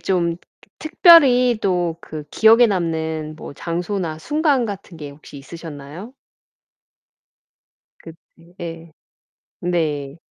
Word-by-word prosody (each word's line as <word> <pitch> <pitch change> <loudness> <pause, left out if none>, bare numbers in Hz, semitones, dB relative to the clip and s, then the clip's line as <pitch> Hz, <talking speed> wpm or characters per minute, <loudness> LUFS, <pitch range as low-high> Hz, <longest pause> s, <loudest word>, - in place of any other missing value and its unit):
좀 170 -3 -1
트 - - -24 0.4
트 310 - -6
특별히 255 - +6
또 175 -3 0
그 155 -3 -8
기억에 225 +2 +5
남는 160 -5 -3
뭐 - - -9
장소나 170 0 -4
순간 295 - 0
같은 195 -4 -8
게 145 -2 -8
혹시 145 0 -14
있으셨나요? 165 - -10 1.9
그 165 - -11 0.4
네. 165 -1 -8 0.7
네. 155 -5 -2
170 Hz, 185 characters per minute, -20 LUFS, 155-210 Hz, 1.9 s, 특별히